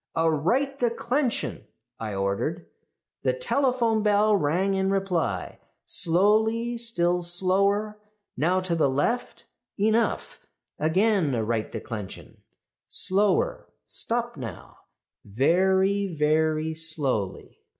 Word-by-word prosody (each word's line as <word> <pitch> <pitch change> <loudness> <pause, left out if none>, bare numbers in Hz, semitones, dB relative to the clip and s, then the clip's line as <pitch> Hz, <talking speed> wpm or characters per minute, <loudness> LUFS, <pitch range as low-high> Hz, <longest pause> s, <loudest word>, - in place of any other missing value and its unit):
"'A 165 0 +2
right 260 - 0
declension,' 240 +2 -1 0.3
I 110 -3 -4
ordered. 100 - -2 0.6
"The - - +1
telephone 255 - +1
bell 210 0 +3
rang 185 +4 +1
in 190 0 0
reply. 195 -3 -1 0.3
'Slowly, 220 +7 +2
still 180 -7 +1
slower; 200 +4 +1 0.3
now 175 +7 +1
to 185 -2 -2
the 160 -4 +2
left 145 - -2 0.3
enough; 220 +3 0 0.4
again 180 - +2
a 115 - -1
right 110 0 -2
declension 105 -4 -8 0.5
slower; 450 - +1 0.2
stop 240 -2 -3
now 120 -5 -9 0.5
very, 190 - +2
very 155 -1 +1
slowly. 145 - -3
190 Hz, 100 wpm, -25 LUFS, 155-220 Hz, 0.6 s, bell